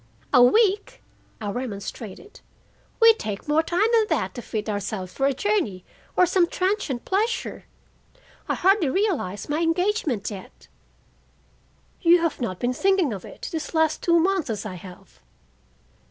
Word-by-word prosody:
"A 250 - +7
week!" 410 - +3 0.4
I 210 -3 -3
remonstrated. 225 - -7 0.6
"We 455 -1 +8
take 210 - -6
more 300 +2 +3
time 350 +5 +1
than 445 -2 +4
that 225 - 0
to 240 - -6
fit 215 -1 -4
ourselves 205 -3 -4
for 270 - +1
a 280 - +1
journey 300 - -1 0.3
or 365 - +6
some 355 0 +2
transient 370 - -1
pleasure. 435 +5 -1 0.8
I - - +1
hardly 380 -4 +3
realize 305 - -1
my 295 +2 -1
engagement 335 - 0
yet." 195 -2 -11 1.3
"You 345 0 +6
have 330 -5 -1
not 185 -7 -2
been 245 +4 -1
thinking 380 - +2
of 195 - -7
it - - -10
for - - -6
these 320 0 -5
last 320 -1 +2
two 340 -1 +3
months 360 -3 +1
as 215 -1 -3
I 210 - -5
have." 180 0 -13
310 Hz, 155 wpm, -24 LUFS, -, 1.3 s, We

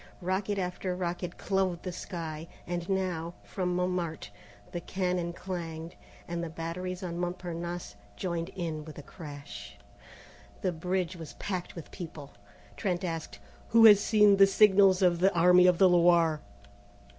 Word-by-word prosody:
Rocket 190 +3 -1
after 180 0 -2
rocket 180 0 -4
clove 190 -3 -1
the 185 - -4
sky, 165 -3 -6 0.2
and 175 0 -4
now, 180 -3 -1
from 180 -2 -2
Montmartre, 180 - -2 0.4
the 175 -2 -4
cannon 180 -2 -1
clanged, 170 -2 -6 0.3
and 170 0 -3
the 170 - -4
batteries 180 +3 -5
on 170 -1 -4
Montparnasse 175 - -4 0.2
joined 170 - -3
in 165 -4 -3
with 155 0 -11
a 145 - -8
crash. 140 - -10 0.9
The 185 - +1
bridge 180 +2 -2
was 160 -3 -9
packed 185 -3 -5
with 170 - -9
people. 155 -5 -8 0.5
Trent 180 -4 -1
asked: 165 -3 -4 0.3
"Who 230 0 +6
has 210 -2 +9
seen 210 -2 +5
the 195 0 +8
signals 195 -2 +5
of 175 -2 +3
the 190 +2 +4
Army 180 +1 +6
of 180 -1 +4
the 190 - +6
Loire?" 170 -3 +4
175 Hz, 145 wpm, -29 LUFS, 165-185 Hz, 0.9 s, has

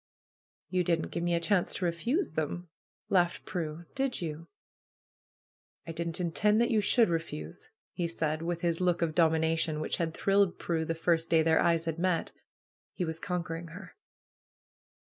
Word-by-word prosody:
"You 185 -1 +2
didn't 165 -1 0
give 170 - -2
me 175 0 +1
a - - +2
chance 180 +1 +1
to 185 - -1
refuse 235 - 0
them!" 160 +3 -3 0.4
laughed 175 -3 +2
Prue. 165 -1 -4
"Did 270 -2 -1
you?" 165 -1 -5 1.4
"I 165 - -5
didn't 165 +1 -3
intend 210 +5 +2
that 235 - +2
you 220 -2 +3
should 230 +3 +4
refuse," 165 - -4 0.2
he 175 -2 -1
said, 155 -2 -2
with 170 0 -2
his 170 0 0
look 175 -1 +2
of 160 -2 0
dominion, 160 -1 +2
which 155 - -1
had 165 -2 -2
thrilled 195 -2 +2
Prue 165 -2 -1
the 165 - -2
first 165 0 +1
day 160 -1 +4
their 160 0 +4
eyes 165 -1 +2
had 165 0 -3
met. 180 -1 0 0.6
He 180 - -1
was 160 0 -3
conquering 170 -2 -3
her. 180 +4 -11
170 Hz, 165 wpm, -30 LUFS, 165-180 Hz, 1.4 s, should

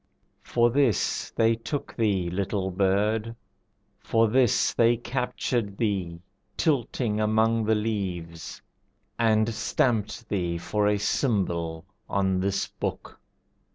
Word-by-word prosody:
For 120 0 +2
this 130 -6 +1
they 115 0 +2
took 125 +6 -5
thee, 100 -6 +1
little 95 +1 -2
bird, 105 +4 +1 0.6
for 115 0 +2
this 125 +1 +3
They 120 0 +4
captured 120 -4 -2
thee, 95 -7 -1 0.4
tilting 120 -7 0
among 110 +1 +2
the 110 +1 +3
leaves, 95 -7 -4 0.6
And 110 0 +3
stamped 110 -1 0
thee 90 -5 -1
for 105 +4 0
a 105 0 +2
symbol 90 - -1 0.2
on 95 -1 +1
this 95 +1 0
book. - - -6
105 Hz, 110 wpm, -26 LUFS, 95-115 Hz, 0.6 s, They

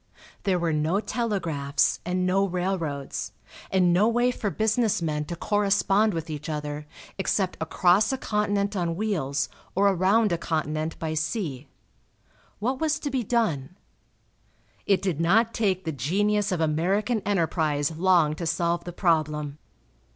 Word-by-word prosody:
There 190 -2 +2
were 170 -2 0
no 155 +6 +1
telegraphs 170 - 0
and 180 +1 -1
no 190 +2 +2
railroads, 175 -6 -3 0.4
and 180 -2 +3
no 195 +5 +4
way 240 +2 +2
for 215 -4 -3
business 220 +2 +1
men 150 -3 -2
to 170 - -5
correspond 205 +1 +2
with 165 -1 -4
each 155 0 -6
other 150 -1 -4 0.3
except 190 -1 0
across 180 +6 +3
a 265 - -1
continent 205 -3 0
on 170 -3 -1
wheels 155 -9 -1 0.3
or 200 +2 +4
around 195 +3 +3
a 170 - 0
continent 155 -1 -2
by 160 -1 -3
sea. 155 - -3 0.9
What 255 +5 -1
was 315 -1 +1
to 290 - -4
be 260 -1 0
done? 180 - -1 1.1
It 195 -1 +3
did 175 -5 -1
not 220 +7 +3
take 190 -4 0
the 160 - -1
genius 200 - 0
of 180 - 0
American 190 +9 +1
enterprise 160 -6 0
long 170 -3 +3
to 170 - -3
solve 170 +1 0
the 175 - -6
problem. 150 -4 0
180 Hz, 145 wpm, -26 LUFS, 155-205 Hz, 1.1 s, no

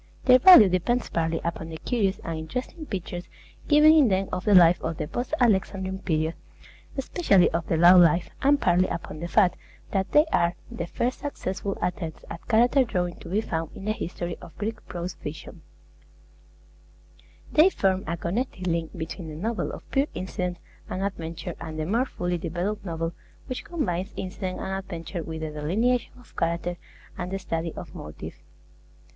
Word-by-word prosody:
Their 255 -1 +7
value 305 - +10
depends 185 +7 0
partly 165 0 0
upon 170 -1 -3
the 160 - -6
curious 200 -1 0
and 165 - -3
interesting 250 - -5
pictures 180 -2 -5 0.4
given 300 +1 +7
in 305 -5 +6
them 190 -1 +1
of 180 - -3
the 205 -2 +5
life 175 -1 +7
of 160 -1 -3
the 150 - -3
post 245 +9 -4
Alexandrine 190 -4 +1
period, 160 -3 0 0.6
especially 255 - +3
of 170 0 -2
the 165 - +1
low 175 +2 +8
life, 170 0 +4
and 285 +1 +4
partly 180 -3 +3
upon 165 -2 -5
the 170 - -4
fact 185 -1 +3 0.3
that 190 -1 -1
they 300 +1 +6
are 170 +1 +2 0.2
the 170 - -4
first 245 +8 -2
successful 195 -8 -4
attempts 170 -3 -3
at 170 - -8
character 245 +4 +4
drawing 180 -7 -2
to - - -10
be 205 +4 +1
found 165 -6 -4
in 195 - -8
the 215 - +1
history 175 -4 -4
of 165 - -13
Greek 220 +1 -4
prose 175 0 -4
fiction. 150 +1 -8 1.9
They 315 +5 +6
form 190 - +1
a 170 - -2
connecting 185 +3 -3
link 165 +1 -3
between 165 +1 -6
the 155 - -7
novel 215 +7 -2
of - - -10
pure 275 +1 +2
incident 180 -1 -3 0.3
and 185 - -3
adventure, 170 -2 -4
and 160 -2 -6
the 155 - -2
more 230 +9 +1
fully 175 -4 -2
developed 180 +6 -3
novel 165 -2 -3 0.3
which 255 - -5
combines 200 - -2
incident 185 0 -4
and 190 - -3
adventure 175 -1 -6
with 160 0 -6
the 155 -1 -3
delineation 210 +12 0
of 245 - -20
character 170 +1 -1 0.4
and 180 0 -3
the 195 - -2
study 165 -3 -3
of - - -8
motive. 75 - -8
185 Hz, 175 wpm, -26 LUFS, 170-215 Hz, 1.9 s, value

